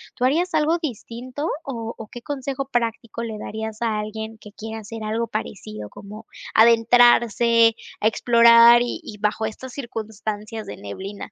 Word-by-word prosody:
¿tú 250 - 0
harías 335 +7 +1
algo 315 +2 +2
distinto 255 +1 -5
o 230 -4 -5
o 220 - -8
qué 240 - -10
consejo 275 0 -4
práctico 230 -2 -2
le 220 -2 -5
darías 220 +1 -6
a 225 -2 0
alguien 220 +1 -6
que 210 -1 -14
quiera 220 +1 -7
hacer 220 +1 -8
algo 220 +2 -1
parecido, 105 - -6
como 210 - -11 0.3
adentrarse, 230 0 +5 0.2
a 215 - +2
explorar 235 +1 +6
y 245 - -4
y 210 - -9
bajo 210 +1 -1
estas 250 +4 -9
circunstancias 220 -3 -6
de - - -7
neblina? 190 - -8
225 Hz, 155 wpm, -22 LUFS, 215-240 Hz, 0.3 s, explorar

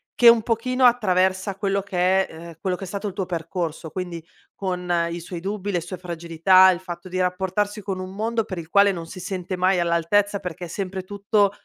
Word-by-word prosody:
che 240 - +8
un 230 -1 +6
pochino, 250 +3 +1
attraversa 190 -4 +2
quello 200 -1 0
che 190 0 +1
è, - - -14
ehm 170 +1 -9
quello 185 -2 -1
che 195 - -6
è - - -9
stato 200 +2 -4
il - - -10
tuo 195 0 -2
percorso, 165 -2 -4
quindi 175 -2 -5 0.3
con 180 -2 -3 0.2
i 170 +1 -4
suoi 170 0 -7
dubbi, 200 +1 -3
le 175 - 0
sue 175 +2 -7
fragilità, 175 +2 +4
il 180 - +1
fatto 180 0 -8
di 185 +1 -3
rapportarsi 190 +3 -1
con 190 -2 -4
un 185 0 -6
mondo 225 +1 -1
per 185 - -6
il 165 -1 -7
quale 200 +1 +5
non 170 -2 -6
si 185 +3 -9
sente 185 0 -4
mai 185 0 +3
all'altezza, 175 +5 +2
perché 180 -2 -6
è - - -8
sempre 190 +1 -4
tutto, 200 +1 +1
185 Hz, 215 wpm, -23 LUFS, 175-200 Hz, 0.3 s, che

